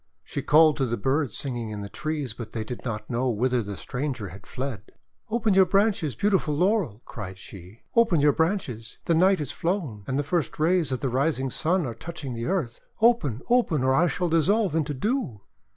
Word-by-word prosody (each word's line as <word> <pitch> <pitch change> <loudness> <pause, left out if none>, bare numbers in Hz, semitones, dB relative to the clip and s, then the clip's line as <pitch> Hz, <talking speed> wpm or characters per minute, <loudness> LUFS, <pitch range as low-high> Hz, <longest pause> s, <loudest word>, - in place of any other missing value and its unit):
She - - -4
called 155 0 +5
to 135 - +1
the 120 0 -1
birds 135 +4 0
singing 120 -5 -4
in 105 -1 -5
the 100 - -5
trees, 150 0 -3
but 115 -1 -8
they 110 - -2
did 120 +2 -7
not 110 -3 -4
know 125 +2 0
whither 125 +2 +1
the 100 -2 -6
stranger 125 -6 -4
had 95 +2 -13
fled. 130 -7 -5 0.4
"Open 220 -2 +1
your 190 -1 +6
branches, 195 - +2
beautiful 190 - +1
Laurel," 175 - +1
cried 95 -4 -7
she, 95 +3 -12
" - - -39
open 230 -8 +4
your 145 0 +4
branches! 140 - -2
The 170 - +2
night 185 +4 +4
is 145 -2 -3
flown, 165 - -2
and 135 - -1
the 145 - +1
first 160 +2 -1
rays 165 -1 +2
of 130 - -2
the 135 - 0
rising 135 0 0
Sun 175 +4 +1
are 120 - -4
touching 145 0 -7
the 115 0 -4
earth. 165 -11 -2 0.2
Open, 220 - +2
open, 235 - +2
or 130 0 +3
I 170 +6 +4
shall 175 +1 -1
dissolve 170 +4 +2
into 150 -3 0
dew!' 205 - -2
145 Hz, 205 wpm, -26 LUFS, 120-175 Hz, 0.4 s, your